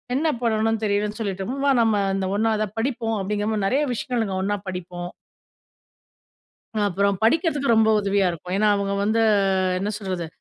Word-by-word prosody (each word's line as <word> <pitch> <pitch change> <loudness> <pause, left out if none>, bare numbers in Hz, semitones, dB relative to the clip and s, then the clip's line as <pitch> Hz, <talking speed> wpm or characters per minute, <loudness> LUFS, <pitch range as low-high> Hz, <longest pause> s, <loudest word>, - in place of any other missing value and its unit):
என்ன 305 +5 +1 0.2
பண்ணணுனு 225 -1 +1
தெரியலன்னு 210 +1 -1
சொல்லிட்டமா, 200 +5 -3
வா 280 - +4
நம்ம 215 -3 +2
இந்த 190 - -1
ஒண்ணா 225 +1 +2
இத 215 - 0
படிப்போம். 225 -3 -1
அப்படிங்கிற 205 +2 -2
மாரி, 205 -2 -1
நெறய 275 +7 +2
விஷயங்கள் 240 0 -2
நாங்க 195 -3 -3
ஒண்ணா 205 +1 0
படிப்போம். 175 -1 -6 1.8
அப்புறம் 200 +1 +1
படிக்கிறதுக்கு 290 - +2
ரொம்ப 220 0 +4
உதவியா 200 -1 +1
இருக்கும். 175 +1 -7
ஏன்னா, 215 +1 +3
அவுங்க 200 0 -1
வந்து 220 +2 +2 0.6
என்ன 200 - -2
சொல்றது, 185 -5 -4
210 Hz, 155 wpm, -23 LUFS, 195-225 Hz, 1.8 s, வா